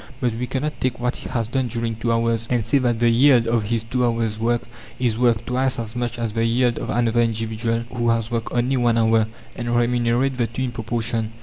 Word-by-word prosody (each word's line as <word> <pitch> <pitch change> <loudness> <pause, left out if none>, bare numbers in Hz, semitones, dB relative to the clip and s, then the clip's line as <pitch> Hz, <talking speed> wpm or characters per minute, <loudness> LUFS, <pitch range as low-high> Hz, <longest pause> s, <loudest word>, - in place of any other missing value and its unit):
But 125 -4 0
we 125 +2 -3
cannot 150 +4 -3
take 130 -2 -1
what 125 +1 -1
he - - -8
has 115 -3 -1
done 130 +1 -1
during 115 -1 -3
two 115 +2 -1
hours, 115 0 0
and 120 -4 +1
say 130 +5 +3
that 120 -3 +1
the 120 +1 +2
yield 125 0 +5
of 115 -2 +1
his 115 +1 -1
two 125 +2 -1
hours' 115 -2 0
work 120 +1 +1 0.3
is 120 -3 0
worth 120 -1 +2
twice 130 +1 0
as 115 0 -5
much 120 -1 -2
as 115 -3 -2
the 115 - 0
yield 120 +1 +2
of - - -5
another 120 0 +2
individual, 115 0 -1
who 120 -1 0
has 115 -1 0
worked 115 -1 -2
only 125 +2 +1
one 120 -2 +2
hour, 110 -1 +3 0.3
and 120 0 -2
remunerate 120 +2 +1
the 120 - +2
two 120 +3 -4
in 125 - -2
proportion. 115 -1 -2
120 Hz, 230 wpm, -22 LUFS, 115-125 Hz, 0.3 s, yield